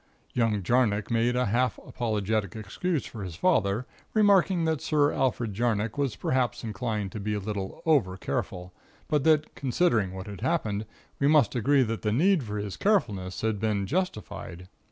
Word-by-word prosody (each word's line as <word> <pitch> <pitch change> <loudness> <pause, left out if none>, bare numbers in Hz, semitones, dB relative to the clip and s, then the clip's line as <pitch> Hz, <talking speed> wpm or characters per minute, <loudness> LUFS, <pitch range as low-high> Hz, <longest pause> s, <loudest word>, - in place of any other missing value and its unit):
"Young 110 -4 +1
Jarnock 110 0 +1
made 115 +1 +2
a 125 0 +2
half 120 +3 +1
apologetic 110 -3 -2
excuse 140 - -2
for 110 -4 -7
his 90 -3 -6
father; 110 - +1 0.3
remarking 195 -5 +4
that 160 -3 0
Sir 150 -1 +2
Alfred 125 -5 0
Jarnock 110 0 0
was 140 -5 -1
perhaps 130 -3 -1
inclined 110 -3 -3
to 110 - -6
be 105 +1 -2
a - - -1
little 100 -1 -5
over 125 - +2
careful; 90 -1 -4 0.3
but 150 -3 +1
that, 155 -1 +3
considering 125 - +1
what 95 0 -6
had 100 -3 -8
happened, 110 -11 -1 0.3
we 140 - +3
must 150 -7 +4
agree 135 +3 +3
that 115 -1 -3
the 105 - 0
need 175 - +3
for 105 -4 -5
his 100 -2 -4
carefulness 100 - 0
had 110 -2 0
been 105 -2 0
justified. 110 - -4
115 Hz, 170 wpm, -27 LUFS, 105-145 Hz, 0.3 s, remarking